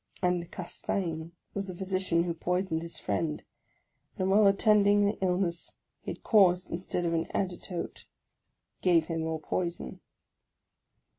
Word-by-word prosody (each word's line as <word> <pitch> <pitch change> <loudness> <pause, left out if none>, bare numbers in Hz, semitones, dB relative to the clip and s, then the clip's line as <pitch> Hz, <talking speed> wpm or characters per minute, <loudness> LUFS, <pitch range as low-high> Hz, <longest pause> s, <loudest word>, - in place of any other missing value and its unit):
And 180 -1 +1
Castaing 170 -2 -3 0.2
was 200 -1 -3
the 185 - -6
physician 185 -3 +1
who 170 -1 -1
poisoned 180 0 -1
his 170 0 -5
friend; 155 -2 -2 0.7
and 190 -1 +1
while 205 +1 +6
attending 205 0 +5
the 205 +2 0
illness 180 -2 0 0.3
he - - -7
had - - -6
caused, 185 -4 +4
instead 175 0 -2
of 170 - +1
an 165 0 0
antidote, 180 -2 -3 0.8
gave 170 -3 +4
him 165 0 -3
more 160 0 -2
poison. 170 +2 -3
180 Hz, 135 wpm, -29 LUFS, 170-195 Hz, 0.8 s, while